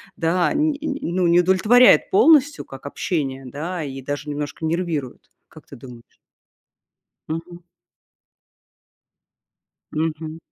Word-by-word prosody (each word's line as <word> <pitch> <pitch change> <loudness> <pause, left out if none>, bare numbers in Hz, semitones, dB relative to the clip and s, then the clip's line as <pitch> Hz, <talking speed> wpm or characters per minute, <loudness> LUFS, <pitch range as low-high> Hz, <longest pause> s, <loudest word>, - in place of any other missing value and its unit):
да, 175 - +1
не 300 -1 0
ну, 185 - -1
не 170 +1 +5
удовлетворяет 215 +8 +5
полностью, 310 -8 +4
как 135 - -12
общение 140 -3 -3
да, 160 +7 -5
и 135 -2 -7
даже 145 +2 -5
немножко 145 +2 -5
нервирует. 160 -6 -3 0.2
Как 155 - -16
ты - - -13
думаешь? 120 -2 -14 1.1
Мгм. 165 +2 -6 2.3
Мгм. 160 0 -3
165 Hz, 105 wpm, -21 LUFS, 145-185 Hz, 2.3 s, не